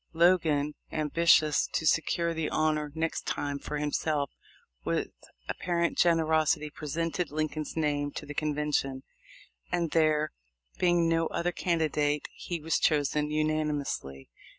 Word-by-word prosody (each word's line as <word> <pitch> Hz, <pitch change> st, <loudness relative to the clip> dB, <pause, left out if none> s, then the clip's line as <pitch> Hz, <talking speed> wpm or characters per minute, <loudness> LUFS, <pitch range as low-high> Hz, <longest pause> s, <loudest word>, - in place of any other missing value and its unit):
Logan, 160 Hz, -4 st, +3 dB, 0.2 s
ambitious 155 Hz, 0 st, +3 dB
to 160 Hz, -, -2 dB
secure 170 Hz, +1 st, +2 dB
the 160 Hz, -1 st, -2 dB
honor 155 Hz, -1 st, 0 dB
next 160 Hz, 0 st, -2 dB
time 145 Hz, -1 st, -2 dB
for 150 Hz, -, -4 dB
himself, 145 Hz, -1 st, -1 dB, 0.5 s
with -, -, -1 dB, 0.4 s
apparent 170 Hz, -1 st, -1 dB
generosity 160 Hz, -2 st, +2 dB
presented 165 Hz, +3 st, -2 dB
Lincoln's 155 Hz, +1 st, -3 dB
name 145 Hz, -2 st, 0 dB
to -, -, -6 dB
the 150 Hz, -, -7 dB
convention, 150 Hz, -3 st, -1 dB, 0.7 s
and 170 Hz, -3 st, 0 dB
there 155 Hz, -1 st, +2 dB, 0.5 s
being 175 Hz, -2 st, +3 dB
no 165 Hz, 0 st, +2 dB
other 175 Hz, +1 st, -1 dB
candidate 150 Hz, -4 st, 0 dB
he 175 Hz, -2 st, -5 dB
was 160 Hz, +1 st, 0 dB
chosen 150 Hz, 0 st, +1 dB
unani 155 Hz, 0 st, +1 dB
mously. 70 Hz, -, -6 dB
155 Hz, 125 wpm, -29 LUFS, 150-165 Hz, 0.7 s, Logan